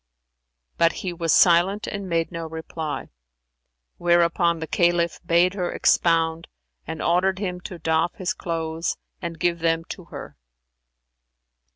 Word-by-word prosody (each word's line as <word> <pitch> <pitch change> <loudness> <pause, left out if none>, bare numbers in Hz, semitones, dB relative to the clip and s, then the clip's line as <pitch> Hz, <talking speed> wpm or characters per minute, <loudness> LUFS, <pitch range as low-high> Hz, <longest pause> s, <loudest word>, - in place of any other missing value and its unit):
But 165 0 +4
he 180 - -2
was 165 -2 -1
silent 185 +4 +4
and 200 -2 -5
made 165 -1 0
no 165 -1 -5
reply; 160 -1 -5 0.9
whereupon 170 0 +3
the 160 - -4
Caliph 170 0 +1
bade 175 +2 +3
her 180 -3 -2
expound 165 -1 +2 0.4
and 160 0 -4
ordered 185 +2 +2
him 180 -3 -3
to 180 - -7
doff 160 +1 0
his 185 -1 -2
clothes 165 -1 -3 0.2
and 170 -2 -5
give 170 0 +1
them 165 0 +1
to - - -7
her. - - -10
170 Hz, 135 wpm, -24 LUFS, 165-175 Hz, 0.9 s, But